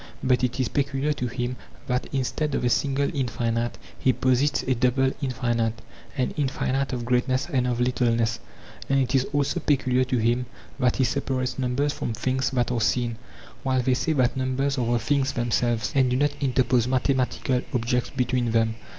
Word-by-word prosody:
But 130 Hz, -1 st, +2 dB
it 125 Hz, +1 st, 0 dB
is 130 Hz, -, +1 dB
peculiar 140 Hz, +1 st, 0 dB
to 125 Hz, -3 st, -3 dB
him 120 Hz, +1 st, -3 dB, 0.3 s
that 125 Hz, +1 st, -1 dB
instead 140 Hz, +2 st, -1 dB
of -, -, -1 dB
a 120 Hz, -, +2 dB
single 140 Hz, 0 st, +1 dB
infinite 120 Hz, -2 st, -1 dB, 0.2 s
he 130 Hz, -, +3 dB
posits 130 Hz, +3 st, +1 dB
a 130 Hz, -, +1 dB
double 130 Hz, +2 st, +2 dB
infinite, 120 Hz, -4 st, -1 dB, 0.4 s
an 130 Hz, -, 0 dB
infinite 135 Hz, -1 st, 0 dB
of 120 Hz, -2 st, -3 dB
greatness 125 Hz, +1 st, +1 dB
and 125 Hz, -2 st, 0 dB
of 120 Hz, -1 st, -1 dB
littleness; 115 Hz, -2 st, +1 dB, 0.5 s
and 135 Hz, 0 st, +3 dB
it 130 Hz, 0 st, 0 dB
is 135 Hz, -1 st, +3 dB
also 145 Hz, +4 st, 0 dB
peculiar 130 Hz, -4 st, +2 dB
to 130 Hz, 0 st, 0 dB
him 120 Hz, +2 st, +1 dB, 0.3 s
that 125 Hz, -2 st, +2 dB
he 135 Hz, -, +2 dB
separates 130 Hz, -1 st, -1 dB
numbers 135 Hz, +3 st, 0 dB
from 115 Hz, -, -3 dB
things 130 Hz, +3 st, 0 dB
that 125 Hz, -2 st, 0 dB
are 120 Hz, -2 st, 0 dB
seen, 120 Hz, 0 st, 0 dB, 0.4 s
while 130 Hz, -2 st, +1 dB
they 130 Hz, -, +2 dB
say 155 Hz, +5 st, 0 dB
that 130 Hz, -4 st, +2 dB
numbers 130 Hz, +1 st, 0 dB
are 120 Hz, -1 st, 0 dB
the 120 Hz, -, +3 dB
things 135 Hz, +4 st, 0 dB
themselves, 120 Hz, -2 st, 0 dB
and 130 Hz, -2 st, +3 dB
do 125 Hz, -, +1 dB
not 145 Hz, +1 st, +2 dB
interpose 125 Hz, -3 st, +2 dB
mathe 130 Hz, +1 st, +1 dB
matical 125 Hz, 0 st, 0 dB
objects 125 Hz, 0 st, 0 dB
between 125 Hz, -2 st, 0 dB
them. 115 Hz, -1 st, +2 dB
125 Hz, 185 wpm, -25 LUFS, 120-135 Hz, 0.5 s, he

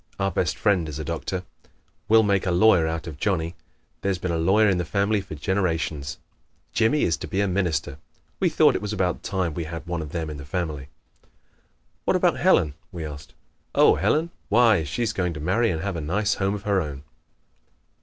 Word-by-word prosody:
Our 95 Hz, 0 st, +1 dB
best 85 Hz, -, -1 dB
friend 95 Hz, -7 st, +1 dB
is 75 Hz, -, -6 dB
a 80 Hz, -, -4 dB
doctor. 85 Hz, +3 st, -3 dB, 0.7 s
We'll 110 Hz, 0 st, +6 dB
make 100 Hz, -2 st, +1 dB
a -, -, +2 dB
lawyer 90 Hz, -2 st, +5 dB
out 80 Hz, +1 st, -3 dB
of 75 Hz, -4 st, -8 dB
Johnnie. 85 Hz, -3 st, 0 dB, 0.5 s
There's 100 Hz, -2 st, 0 dB
been 90 Hz, 0 st, -3 dB
a 85 Hz, -, 0 dB
lawyer 100 Hz, +6 st, +4 dB
in 95 Hz, -3 st, +2 dB
the -, -, 0 dB
family 100 Hz, +4 st, 0 dB
for 95 Hz, -4 st, -8 dB
generations. 80 Hz, -4 st, -1 dB, 0.6 s
Jimmie 115 Hz, +7 st, +2 dB
is 80 Hz, -, +1 dB
to -, -, -7 dB
be 95 Hz, -, -2 dB
a 100 Hz, -, +2 dB
minister. 80 Hz, -7 st, -1 dB, 0.4 s
We -, -, +3 dB
thought -, -, +4 dB
it -, -, -2 dB
was 105 Hz, 0 st, -3 dB
about 95 Hz, -3 st, -1 dB
time 95 Hz, -5 st, -2 dB
we 85 Hz, +1 st, -4 dB
had 80 Hz, +1 st, -7 dB
one 85 Hz, -1 st, -3 dB
of 75 Hz, -2 st, -7 dB
them 80 Hz, -2 st, -3 dB
in 75 Hz, -, -6 dB
the 70 Hz, -, -8 dB
family." 75 Hz, -3 st, -4 dB, 1.2 s
"What -, -, +2 dB
about -, -, +2 dB
Helen?" 75 Hz, -2 st, +3 dB, 0.2 s
we 85 Hz, -3 st, -5 dB
asked. 70 Hz, -1 st, -9 dB, 0.4 s
"Oh, -, -, +6 dB
Helen 165 Hz, +3 st, +1 dB, 0.2 s
why, 110 Hz, -5 st, +5 dB
she's 110 Hz, -, -2 dB
going 90 Hz, -4 st, -1 dB
to -, -, -6 dB
marry 100 Hz, +9 st, +1 dB
and 80 Hz, -3 st, -2 dB
have 100 Hz, -2 st, -2 dB
a 80 Hz, -, -3 dB
nice 100 Hz, +8 st, 0 dB
home 100 Hz, +1 st, 0 dB
of 100 Hz, -, -7 dB
her 100 Hz, -3 st, +2 dB
own." 70 Hz, -3 st, -6 dB
90 Hz, 205 wpm, -24 LUFS, 80-100 Hz, 1.2 s, We'll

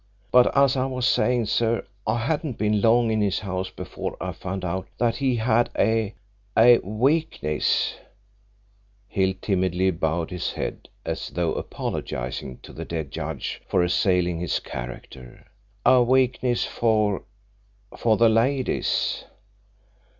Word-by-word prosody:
But 125 Hz, +2 st, +5 dB
as 140 Hz, -1 st, +5 dB
I 130 Hz, 0 st, 0 dB
was 130 Hz, -2 st, -2 dB
saying, 125 Hz, -2 st, +2 dB
sir, 115 Hz, +2 st, 0 dB, 0.2 s
I -, -, +2 dB
hadn't 140 Hz, +2 st, -2 dB
been 105 Hz, 0 st, +1 dB
long 115 Hz, +1 st, +4 dB
in 110 Hz, -1 st, +1 dB
his 100 Hz, -2 st, +1 dB
house 95 Hz, -2 st, -3 dB
before -, -, -6 dB
I -, -, -3 dB
found 95 Hz, 0 st, -5 dB
out 95 Hz, +2 st, -3 dB
that 115 Hz, -1 st, +1 dB
he 130 Hz, -2 st, +1 dB
had 120 Hz, +1 st, +2 dB
a 110 Hz, -2 st, +1 dB, 0.4 s
a 120 Hz, +1 st, +8 dB
weakness 110 Hz, -, 0 dB, 0.6 s
" 100 Hz, 0 st, -37 dB
Hill 95 Hz, -1 st, +1 dB
timidly 95 Hz, -1 st, +1 dB
bowed 80 Hz, 0 st, -1 dB
his 90 Hz, -2 st, -3 dB
head -, -, -5 dB, 0.2 s
as -, -, -3 dB
though 85 Hz, -2 st, -1 dB
apologising 65 Hz, 0 st, -4 dB
to -, -, -12 dB
the -, -, -6 dB
dead 80 Hz, -4 st, -5 dB
judge 80 Hz, -3 st, -4 dB
for 90 Hz, -, +2 dB
assailing 90 Hz, -1 st, +1 dB
his 90 Hz, -, -1 dB
character 60 Hz, 0 st, -9 dB, 0.4 s
"a 130 Hz, -1 st, +6 dB
weakness 125 Hz, 0 st, +2 dB
for 110 Hz, -3 st, +1 dB, 0.7 s
for 110 Hz, -2 st, +2 dB
the 115 Hz, -, +5 dB
ladies. 125 Hz, +4 st, +1 dB
105 Hz, 135 wpm, -24 LUFS, 90-120 Hz, 0.7 s, a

